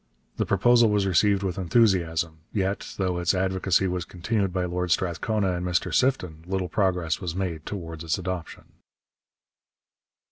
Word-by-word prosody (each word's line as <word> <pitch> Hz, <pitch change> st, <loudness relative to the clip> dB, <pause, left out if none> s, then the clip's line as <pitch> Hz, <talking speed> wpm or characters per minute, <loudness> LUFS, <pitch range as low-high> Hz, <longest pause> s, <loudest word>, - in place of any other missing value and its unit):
The -, -, -1 dB
proposal 120 Hz, -2 st, +4 dB
was 105 Hz, -1 st, +2 dB
received 100 Hz, +2 st, +3 dB
with 95 Hz, -1 st, -2 dB
enthusiasm; 85 Hz, -5 st, +1 dB
yet, 100 Hz, -1 st, -2 dB
though 90 Hz, -2 st, -1 dB
its 90 Hz, +2 st, +1 dB
advocacy 95 Hz, 0 st, +1 dB
was 90 Hz, -1 st, -2 dB
continued 95 Hz, +3 st, -2 dB
by 90 Hz, 0 st, -1 dB
Lord 90 Hz, 0 st, -2 dB
Strathcona 95 Hz, +3 st, 0 dB
and 90 Hz, 0 st, -3 dB
Mr 90 Hz, -1 st, -1 dB
Sifton, 90 Hz, -, 0 dB
little 95 Hz, -1 st, -2 dB
progress 90 Hz, -5 st, 0 dB
was 90 Hz, -3 st, -4 dB
made 85 Hz, -5 st, -3 dB
towards 85 Hz, -5 st, -6 dB
its 80 Hz, +2 st, 0 dB
adoption. 90 Hz, -2 st, -5 dB
90 Hz, 145 wpm, -25 LUFS, 85-95 Hz, -, proposal